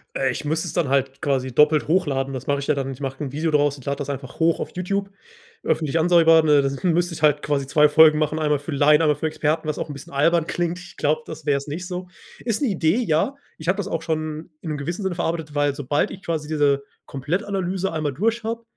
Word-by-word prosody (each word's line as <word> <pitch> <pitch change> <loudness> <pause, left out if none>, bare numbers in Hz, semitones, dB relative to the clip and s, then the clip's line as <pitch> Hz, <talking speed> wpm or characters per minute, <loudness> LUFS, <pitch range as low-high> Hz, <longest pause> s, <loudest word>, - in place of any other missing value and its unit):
Äh, 135 -1 +1
ich 150 - -6
müsste 160 +2 -1
es - - -6
dann 170 -7 0
halt 135 0 0
quasi 130 -3 -1
doppelt 150 +2 +4
hochladen. 140 -6 0
Das 130 - -6
mache 140 0 +1
ich 140 - -5
ja - - +2
dann 135 -1 -3
ich 130 - -9
mache 135 +1 -4
'n 135 - -4
Video 155 +2 -1
daraus 145 -1 +2
und 130 - -14
lade 140 0 -2
das 145 -1 -5
einfach 135 0 -6
hoch 165 0 +3
auf - - -4
YouTube, 195 +2 -2 0.5
öffentlich 160 0 0
einsehbar, 165 -1 +5
ne? 150 -2 +5
Dann 140 +6 0
müsste 175 +1 0
ich 160 - -9
halt 150 -1 +4
quasi 140 -2 -1
2 150 +1 +4
Folgen 155 0 +6
machen. 155 +1 0
Einmal 150 -2 +1
für 145 +3 -7
Laien, 150 +2 +4
einmal 150 -2 +3
für 160 +3 -2
Experten, 155 +1 -1
was 150 - -2
auch - - -4
'n - - -5
bisschen 140 0 -11
albern 165 +3 +2
klingt. 175 +1 -2
Ich 180 - -13
glaube, 155 +1 0
das 155 - -9
wäre 140 -1 +2
es 140 - -7
nicht 175 +5 -5
so. 180 0 -5 0.3
Ist 230 +2 -2
'ne 275 - +2
Idee, 170 -1 +1
ja, 180 - +1 0.2
ich 160 - -10
habe 190 +3 +2
das 200 -1 -3
auch 165 -4 -2
schon 155 0 -3
in 165 - -6
'nem 150 - -2
gewissen 175 +8 -4
Sinne 190 -2 -1
verarbeitet, 165 -3 -3
weil 145 -1 +1
sobald 145 +1 0
ich 190 - -10
quasi 160 -3 -3
diese 145 -3 +1 0.2
Komplettanalyse 185 - -2
einmal 155 -3 -2
durch 225 - 0
habe, 230 +1 -4
155 Hz, 255 wpm, -22 LUFS, 145-170 Hz, 0.5 s, Folgen